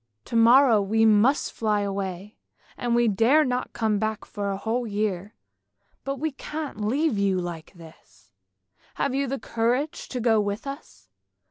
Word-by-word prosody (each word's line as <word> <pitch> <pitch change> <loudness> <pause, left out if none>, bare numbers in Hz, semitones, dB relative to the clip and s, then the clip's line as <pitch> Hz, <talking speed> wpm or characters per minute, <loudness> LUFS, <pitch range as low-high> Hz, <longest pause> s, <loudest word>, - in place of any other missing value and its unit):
" 105 - -52
To - - -2
morrow 235 0 +6
we 220 +3 +2
must 220 +6 +3
fly 215 -2 0
away, 195 0 -5 0.4
and 240 -1 -1
we 240 0 +3
dare 230 +9 +4
not 250 -1 -2
come 215 -3 0
back 215 0 -3
for 200 -1 -4
a 195 - -2
whole 230 +4 -2
year, 205 -2 -3 0.7
but 275 0 -3
we 310 +3 -2
can't 285 -5 -6
leave 255 +1 0
you 195 -2 +1
like 170 -3 -6
this! 160 - -17 0.6
Have - - -1
you 275 +1 0
courage 245 +6 -2
to 255 - -4
go 225 -2 +3
with 205 +3 -3
us? 100 - -9
220 Hz, 160 wpm, -25 LUFS, 200-250 Hz, 0.7 s, morrow